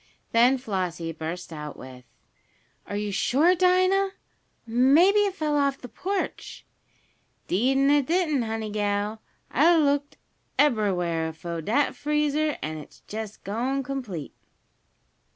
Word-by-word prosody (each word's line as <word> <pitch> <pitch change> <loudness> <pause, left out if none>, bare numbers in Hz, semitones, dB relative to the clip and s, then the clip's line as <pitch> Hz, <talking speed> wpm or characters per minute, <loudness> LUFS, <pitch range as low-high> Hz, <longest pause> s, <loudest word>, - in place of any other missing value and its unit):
Then 245 +3 +5
Flossie 185 -8 -3
burst 165 +2 -6
out 150 -1 -7
with: 130 -1 -11 0.8
"Are 205 - -5
you 210 0 -2
sure, 285 - +3
Dinah? 370 +2 +3 0.5
Maybe 275 - +5
it 390 -2 -2
fell 305 -4 -1
off 280 -1 +1
the 250 - -10
porch." 375 - -4 0.8
"Deed 250 +9 +2
an' 275 +1 +4
it 290 -3 +3
didn't, 325 -6 +1
honey 220 -1 -3
gal. 205 +1 -1 0.3
I 265 - 0
done 325 -1 +6
looked 285 0 0 0.4
eberywhar 180 - +1
fo' 170 0 -5
dat 235 - +1
freezer, 300 0 0
an' 155 0 -4
it's 150 - -14
jest 215 -1 -7
gone 250 +7 -1
complete." 245 - -5
245 Hz, 130 wpm, -26 LUFS, 190-295 Hz, 0.8 s, done